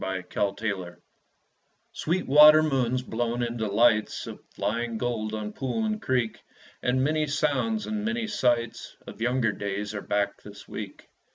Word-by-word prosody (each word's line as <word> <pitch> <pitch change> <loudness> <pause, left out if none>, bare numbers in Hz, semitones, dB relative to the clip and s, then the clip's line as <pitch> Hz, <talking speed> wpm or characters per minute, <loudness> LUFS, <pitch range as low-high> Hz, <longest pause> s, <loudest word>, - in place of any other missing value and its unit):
Rose 95 -1 -3 0.4
Lorraine 95 -5 -3 1.0
Sweet 175 +4 -1
water 150 +2 +8
moons, 130 -4 0
blown 120 0 -2
into 115 -2 -2
lights 110 +1 +2
Of - - -9
flying 115 +1 -2
gold 110 -2 -2
on 105 -1 -5
pool 135 - -2
and 215 0 -2
creek, 125 -4 0 0.4
And 130 +1 +1
many 155 +1 +1
sounds 155 +10 0
and 215 -1 -3
many 235 +1 -1
sights 120 - -1
Of - - -10
younger 120 -1 +2
days 100 +1 -4
are 100 - -4
back 100 0 -1
this 100 -1 -12
week. 105 -3 -8
120 Hz, 150 wpm, -27 LUFS, 110-150 Hz, 1.0 s, water